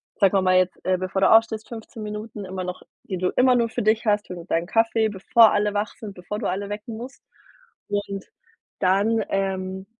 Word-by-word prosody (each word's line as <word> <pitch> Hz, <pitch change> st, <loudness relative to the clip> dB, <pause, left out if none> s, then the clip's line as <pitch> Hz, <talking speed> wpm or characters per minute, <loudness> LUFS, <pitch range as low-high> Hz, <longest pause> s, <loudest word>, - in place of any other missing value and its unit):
sagen 195 Hz, -3 st, +3 dB
wir 195 Hz, -, +3 dB
mal 185 Hz, 0 st, +4 dB
jetzt, 185 Hz, 0 st, +1 dB
äh, 185 Hz, 0 st, +2 dB
bevor 185 Hz, +1 st, -2 dB
du 190 Hz, -, +5 dB
aufstehst, 225 Hz, -1 st, +4 dB
15 225 Hz, -1 st, -9 dB
Minuten 210 Hz, 0 st, -6 dB
immer 185 Hz, 0 st, -5 dB
noch, 180 Hz, 0 st, -6 dB, 0.2 s
die 195 Hz, -7 st, -4 dB
du 180 Hz, 0 st, +1 dB
immer 255 Hz, 0 st, +5 dB
nur 235 Hz, -1 st, +2 dB
für 220 Hz, -, -3 dB
dich 220 Hz, +2 st, +2 dB
hast. 205 Hz, -1 st, +1 dB
Hol 180 Hz, -, -6 dB
dir 170 Hz, -, -9 dB
deinen 165 Hz, -2 st, 0 dB
Kaffee, 225 Hz, 0 st, +2 dB
bevor 220 Hz, +3 st, +5 dB
alle 205 Hz, 0 st, +1 dB
wach 205 Hz, +1 st, -1 dB
sind, 210 Hz, -3 st, -8 dB
bevor 195 Hz, +4 st, -6 dB
du -, -, -2 dB
alle 200 Hz, +2 st, -3 dB
wecken 215 Hz, +2 st, -6 dB
musst. 250 Hz, +3 st, -10 dB, 0.7 s
Und 200 Hz, -1 st, -3 dB, 0.5 s
dann, 205 Hz, +4 st, +2 dB
ähm, 190 Hz, -1 st, -2 dB
205 Hz, 210 wpm, -24 LUFS, 190-220 Hz, 0.7 s, du